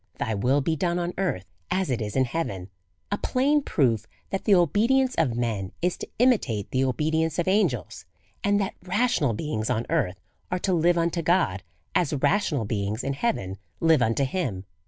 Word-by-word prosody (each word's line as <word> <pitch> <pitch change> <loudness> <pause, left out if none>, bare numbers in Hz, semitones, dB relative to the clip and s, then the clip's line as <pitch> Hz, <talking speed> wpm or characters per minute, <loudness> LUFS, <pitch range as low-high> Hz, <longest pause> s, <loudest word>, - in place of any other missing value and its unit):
Thy 110 - -1
will 125 +7 +2
he 160 - +1
done 170 +3 0
on 175 0 -2
earth, 175 - -1 0.2
as 185 -5 0
it 120 -2 -1
is 105 -1 -4
in 130 -1 +3
heaven; 100 - -4 0.4
a 205 - 0
plain 285 +4 +2
proof 115 - +1 0.2
that 195 - -3
the 205 - +6
obedience 230 - +3
of 125 -7 +1
men 110 -6 -2
is 180 +1 0
to - - -6
imitate 205 - +2
the 130 - +1
obedi 150 +5 +1
ence 160 -1 -1
of 175 - 0
angels, 185 - 0 0.4
and 205 0 +3
that 195 - -1
rational 185 - +1
beings 110 -2 -3
on 115 - 0
earth 90 0 0 0.3
are 180 - 0
to 185 +1 0
live 175 +1 +3
unto 170 0 0
God, 165 - +2 0.3
as 165 -4 +1
rational 145 - +1
beings 105 +1 -2
in 140 - -1
heaven 115 - -2 0.2
live 160 -4 +4
unto 115 +4 +2
him. 130 - -3
160 Hz, 185 wpm, -26 LUFS, 115-185 Hz, 0.4 s, the